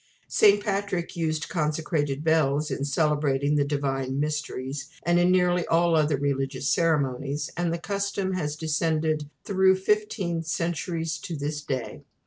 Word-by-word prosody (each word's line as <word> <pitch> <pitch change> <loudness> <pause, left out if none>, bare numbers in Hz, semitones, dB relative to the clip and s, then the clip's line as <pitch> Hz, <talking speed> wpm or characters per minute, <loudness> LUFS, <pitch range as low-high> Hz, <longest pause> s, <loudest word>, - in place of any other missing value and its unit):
St. 205 -1 +5
Patrick 195 -4 -2
used 155 -2 -1
consecrated 150 -3 -1
bells 155 -2 +2
in 140 - -2
celebrating 145 -1 +1
the 145 -1 +3
Divine 135 -2 -1
Mysteries, 145 -2 -3
and 175 +1 +3
in 175 +1 +4
nearly 180 -1 +3
all 170 0 +3
other 150 -2 +2
religious 135 -1 -1
ceremonies, 145 -3 0
and 175 0 0
the 170 - -1
custom 200 +1 -2
has 150 -5 -2
descended 155 -1 0
through 190 -1 +4
fifteen 190 -3 0
centuries 165 0 -2
to 165 - -5
this 150 +1 -3
day. 130 -5 -4
155 Hz, 135 wpm, -26 LUFS, 145-175 Hz, -, St